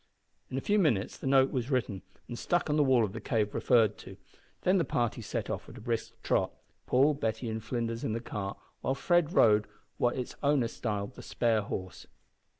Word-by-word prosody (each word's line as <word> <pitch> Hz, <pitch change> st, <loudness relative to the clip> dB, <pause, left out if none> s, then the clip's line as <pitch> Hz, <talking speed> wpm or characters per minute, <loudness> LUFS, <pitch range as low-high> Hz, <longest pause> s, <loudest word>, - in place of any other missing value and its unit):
In 130 Hz, -, -3 dB
a -, -, -1 dB
few 210 Hz, +7 st, +2 dB
minutes 115 Hz, -, +1 dB
the -, -, -6 dB
note 135 Hz, 0 st, +4 dB
was 125 Hz, 0 st, -2 dB
written 115 Hz, -, -1 dB, 0.3 s
and 120 Hz, -, -6 dB
stuck 175 Hz, +5 st, 0 dB
on -, -, +2 dB
the 150 Hz, -, +4 dB
wall 130 Hz, -4 st, +4 dB
of 95 Hz, -, -7 dB
the 115 Hz, -, -6 dB
cave 105 Hz, -1 st, 0 dB
referred 110 Hz, -4 st, +3 dB
to; -, -, -11 dB, 0.4 s
then 185 Hz, +1 st, +3 dB
the -, -, +3 dB
party 120 Hz, -4 st, -1 dB
set 105 Hz, -, -3 dB
off -, -, -5 dB
at -, -, -11 dB
a -, -, -10 dB
brisk 115 Hz, 0 st, -3 dB
trot, -, -, +1 dB, 0.4 s
Paul, 140 Hz, +4 st, +4 dB
Betty, 115 Hz, -4 st, -2 dB
and 110 Hz, 0 st, -4 dB
Flinders 115 Hz, 0 st, -3 dB
in 110 Hz, -, -1 dB
the 115 Hz, -, -1 dB
cart, 105 Hz, -4 st, -5 dB, 0.2 s
while 135 Hz, -, 0 dB
Fred 175 Hz, +2 st, +2 dB
rode 105 Hz, -, +5 dB, 0.3 s
what 120 Hz, +1 st, +2 dB
its 125 Hz, -, -4 dB
owner 140 Hz, -5 st, +2 dB
styled 105 Hz, 0 st, -3 dB
the -, -, -11 dB
spare 115 Hz, -3 st, +1 dB
horse. 95 Hz, -2 st, -6 dB
120 Hz, 210 wpm, -30 LUFS, 110-135 Hz, 0.4 s, rode